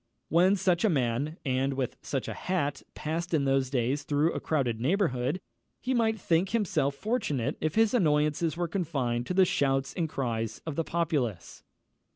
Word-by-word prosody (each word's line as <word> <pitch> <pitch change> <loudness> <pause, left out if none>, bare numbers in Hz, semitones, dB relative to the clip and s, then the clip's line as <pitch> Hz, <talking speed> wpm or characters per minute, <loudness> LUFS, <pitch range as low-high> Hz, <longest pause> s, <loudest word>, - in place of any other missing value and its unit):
When 180 +4 +5
such 180 -3 +1
a 220 - +4
man, 140 +1 0
and 135 +1 0
with 130 -2 -2
such - - -3
a - - -3
hat, 145 -7 -2
passed 165 +2 -2
in 140 -3 +1
those 135 -1 +2
days 130 +2 0
through 145 +3 +1
a - - -2
crowded 125 -8 -1
neighbourhood, 150 - +1 0.4
he 260 - -1
might 220 -3 +1
think 175 +1 +1
himself 180 -11 0
fortunate 150 - -1
if 155 0 -1
his 225 +1 +4
annoyances 155 - +2
were 175 -1 0
confined 135 -9 -1
to 180 - -2
the 190 0 +6
shouts 135 -4 +1
and 165 -3 -1
cries 115 -5 -2
of 160 -3 -4
the 165 - 0
populace. 145 - -2
150 Hz, 175 wpm, -29 LUFS, 135-175 Hz, 0.4 s, the